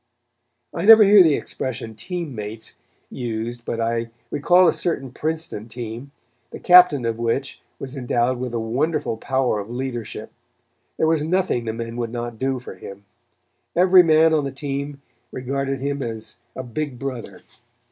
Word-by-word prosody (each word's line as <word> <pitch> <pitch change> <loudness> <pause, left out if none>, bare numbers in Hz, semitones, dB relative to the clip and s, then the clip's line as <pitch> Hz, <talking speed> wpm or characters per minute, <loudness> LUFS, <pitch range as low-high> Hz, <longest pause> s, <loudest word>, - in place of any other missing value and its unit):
I 170 - -3
never 220 0 +10
hear 205 0 +8
the 160 -5 +5
expression 115 -4 -4
"team 170 - -5
mates" 110 0 -6 0.4
used 120 0 -4
but 115 - -3
I 115 0 -1 0.2
recall 175 +5 +4
a - - +4
certain 135 -7 -2
Princeton 155 -7 -4
team, 120 +3 -7 0.4
the - - -8
captain 180 -8 +6
of 115 0 -2
which 120 +4 -2 0.2
was 135 +1 -7
endowed 125 -1 0
with 125 -1 -4
a - - 0
wonderful 120 +4 -1
power 130 -1 0
of 100 +2 -7
leadership. 120 -3 -5 0.7
There - - +2
was 160 -1 +2
nothing 170 -7 0
the 110 - -2
men 115 +1 -6
would 120 -2 -3
not 120 -1 -5
do 135 0 0
for 125 - -9
him. 100 +2 -11 0.7
Every 185 +1 +7
man 160 -1 +4
on 155 -2 +2
the 140 - -3
team 140 0 -5 0.3
regarded 135 +1 -3
him 140 0 -2
as 110 -3 -5 0.2
a 130 - -5
big 130 +2 -4
brother. 130 -2 -6
130 Hz, 160 wpm, -22 LUFS, 115-155 Hz, 0.7 s, never